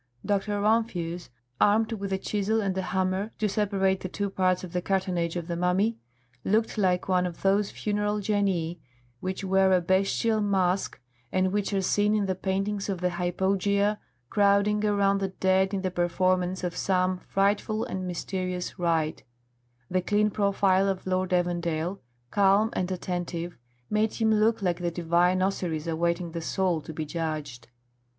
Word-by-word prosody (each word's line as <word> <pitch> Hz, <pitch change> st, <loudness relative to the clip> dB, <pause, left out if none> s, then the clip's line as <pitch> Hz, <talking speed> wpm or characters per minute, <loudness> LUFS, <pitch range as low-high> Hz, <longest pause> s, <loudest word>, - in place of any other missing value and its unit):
Dr. 205 Hz, 0 st, 0 dB
Rumphius, 200 Hz, -6 st, 0 dB, 0.3 s
armed 215 Hz, +2 st, +3 dB
with 200 Hz, -3 st, -4 dB
a 190 Hz, -, +1 dB
chisel 210 Hz, +3 st, 0 dB
and 195 Hz, -3 st, -1 dB
a 190 Hz, -, 0 dB
hammer, 185 Hz, +2 st, -1 dB
to 215 Hz, -, +1 dB
separate 195 Hz, -2 st, +1 dB
the 185 Hz, -, -5 dB
two 200 Hz, +1 st, -3 dB
parts 185 Hz, -1 st, +1 dB
of 180 Hz, -1 st, -8 dB
the 180 Hz, -, 0 dB
cartonnage 180 Hz, -3 st, -1 dB
of 170 Hz, -2 st, -4 dB
the 170 Hz, -, -2 dB
mummy, 180 Hz, +6 st, +1 dB, 0.5 s
looked 220 Hz, +3 st, +1 dB
like 185 Hz, -4 st, +1 dB
one 180 Hz, -1 st, +2 dB
of 170 Hz, -, -9 dB
those 195 Hz, +1 st, +3 dB
funeral 210 Hz, 0 st, -1 dB
genii 190 Hz, -5 st, 0 dB, 0.4 s
which 185 Hz, +2 st, -4 dB
wear 190 Hz, 0 st, +3 dB
a 185 Hz, -, +5 dB
bestial 195 Hz, +5 st, +1 dB
mask 190 Hz, -2 st, 0 dB, 0.3 s
and 185 Hz, 0 st, +1 dB
which 205 Hz, 0 st, 0 dB
are 195 Hz, -1 st, 0 dB
seen 210 Hz, +3 st, +2 dB
in 210 Hz, -2 st, +1 dB
the 190 Hz, -, 0 dB
paintings 195 Hz, +2 st, -2 dB
of 190 Hz, -3 st, -2 dB
the 180 Hz, 0 st, 0 dB
hypogea 195 Hz, +4 st, +1 dB, 0.3 s
crowding 205 Hz, +1 st, +3 dB
around 200 Hz, -1 st, +2 dB
the 195 Hz, -, 0 dB
dead 190 Hz, 0 st, +1 dB
in 195 Hz, -2 st, -2 dB
the 185 Hz, -, -1 dB
performance 180 Hz, +1 st, 0 dB
of 180 Hz, -1 st, -2 dB
some 185 Hz, -1 st, +1 dB
frightful 205 Hz, +3 st, 0 dB
and 185 Hz, -1 st, -4 dB
mysterious 180 Hz, 0 st, -4 dB
rite; 165 Hz, -3 st, 0 dB, 0.6 s
the 185 Hz, +5 st, 0 dB
clean 210 Hz, +3 st, +2 dB
profile 195 Hz, -1 st, +2 dB
of 190 Hz, -1 st, -3 dB
Lord 185 Hz, 0 st, 0 dB
Evandale, 175 Hz, 0 st, 0 dB, 0.3 s
calm 200 Hz, +2 st, +4 dB
and 185 Hz, 0 st, -2 dB
attentive, 175 Hz, -1 st, -4 dB, 0.3 s
made 215 Hz, +4 st, 0 dB
him 220 Hz, -1 st, +2 dB
look 215 Hz, 0 st, +2 dB
like 175 Hz, -2 st, 0 dB
the 175 Hz, -1 st, -1 dB
divine 175 Hz, +2 st, +2 dB
Osiris 175 Hz, -5 st, -1 dB
awaiting 170 Hz, +1 st, -1 dB
the 165 Hz, 0 st, -4 dB
soul 175 Hz, -1 st, 0 dB
to 160 Hz, -, -8 dB
be 155 Hz, 0 st, -4 dB
judged. 150 Hz, -6 st, -4 dB
190 Hz, 165 wpm, -27 LUFS, 180-200 Hz, 0.6 s, a